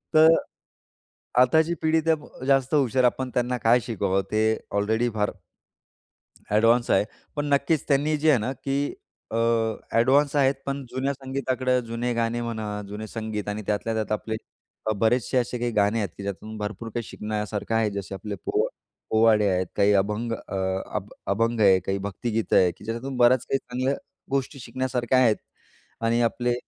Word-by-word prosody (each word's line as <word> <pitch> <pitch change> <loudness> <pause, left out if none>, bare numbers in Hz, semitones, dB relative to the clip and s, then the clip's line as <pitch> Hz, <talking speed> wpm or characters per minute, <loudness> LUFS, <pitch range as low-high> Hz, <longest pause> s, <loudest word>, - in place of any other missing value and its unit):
तर 160 +1 +8 1.1
आताची 160 +6 +4
पिढी 160 0 +3
तर 150 -5 -1
जास्त 135 0 +3
हुशार 130 -3 +2
आपण 130 +1 +1
त्यांना 125 0 0
काय 115 +2 +4
शिकवावं 95 -4 0
ते 110 0 +2 0.3
ऑलरेडी 110 +4 +1
फार 105 -1 +1 1.2
अ‍ॅडव्हान्स 115 +3 +3
आहे. 95 - +4 0.3
पण 145 0 -1
नक्कीच 140 +2 +2
त्यांनी 150 +2 +2
जे 155 +1 +2
आहे 135 - +5
ना 120 +5 -2
की 140 +3 -2 0.4
अ, - - -3
अ‍ॅडव्हान्स 115 +5 +2
आहेत 135 -1 +4
पण 140 0 -3
जुन्या 135 +3 -1
संगीताकडे 130 -1 -1
जुने 115 +1 -2
गाणे 115 0 0
म्हणा, 110 -3 -4
जुने 105 +2 -6
संगीत 110 -2 -4
आणि 105 +1 -3
त्यातल्या 105 +2 -1
त्यात 110 -1 -2
आपले 110 +1 -2 0.5
अ, - - +3
बरेचसे 120 +4 +2
असे 125 0 0
काही 120 0 -1
गाणे 105 +1 +2
आहेत 100 -4 -1
की 100 - -7
ज्यातून 105 +2 -6
भरपूर 110 +2 -5
काही 120 +2 -3
शिकण्यासारखं 105 0 -3
आहे. 110 -1 +2
जसे 100 -1 -5
आपले 100 +1 -5
पो - - +1 0.4
पोवाडे 110 -1 +4
आहेत, 90 -1 0
काही 105 +1 +4
अभंग 105 +4 0
अ, 110 - -6 0.4
अभ 105 -1 -3 0.2
अभंग 115 +3 +1
आहे, 95 -2 +6
काही 95 +2 -2
भक्तिगीतं 110 +2 -1
आहे, 90 -2 +5
की - - -17
ज्याच्यातून 120 +4 -4
बऱ्याच 125 0 +4
काही 135 - +1
चांगल्या 130 +3 -2 0.4
गोष्टी 135 0 -1
शिकण्यासारख्या 130 0 0
आहेत 115 -4 +5 0.7
आणि 115 +1 +2
आपले 120 0 -1
115 Hz, 165 wpm, -25 LUFS, 105-130 Hz, 1.2 s, तर